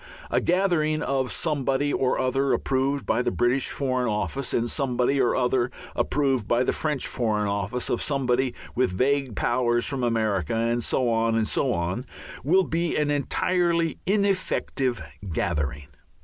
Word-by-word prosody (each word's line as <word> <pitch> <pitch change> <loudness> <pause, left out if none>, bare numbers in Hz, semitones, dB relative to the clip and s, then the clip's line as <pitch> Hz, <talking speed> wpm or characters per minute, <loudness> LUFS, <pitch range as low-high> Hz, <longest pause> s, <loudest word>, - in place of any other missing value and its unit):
A - - +2
gathering 170 -4 +1
of 135 -2 0
somebody 145 -2 0
or 130 - +1
other 135 +1 +1
approved 135 +1 0
by 115 - +1
the - - 0
British 125 +2 +1
Foreign 130 -3 0
Office 125 +5 -2
and 115 - +1
of 120 - -3
somebody 135 0 +1
or 125 - +2
other 125 -1 +1 0.3
approved 135 -6 0
by 120 +1 +2
the - - 0
French 150 -3 -1
Foreign 105 -4 0
Office, 100 +4 -2
of 120 - -1
somebody 130 -3 0 0.2
with 120 -7 0
vague 135 -2 +1
powers 120 +1 +1
from 135 -3 -3
America, 110 -6 0
and 115 +1 0
so 130 +2 +1
on 115 0 +1
and 110 -1 +1
so 135 - +1
on, 90 +6 -2 0.4
will 185 +7 +4
be 170 0 -1
an 150 -1 +1
entirely 170 +3 +1
ineffective 185 - 0 0.3
gathering. 75 -3 -2
130 Hz, 155 wpm, -25 LUFS, 115-140 Hz, 0.4 s, will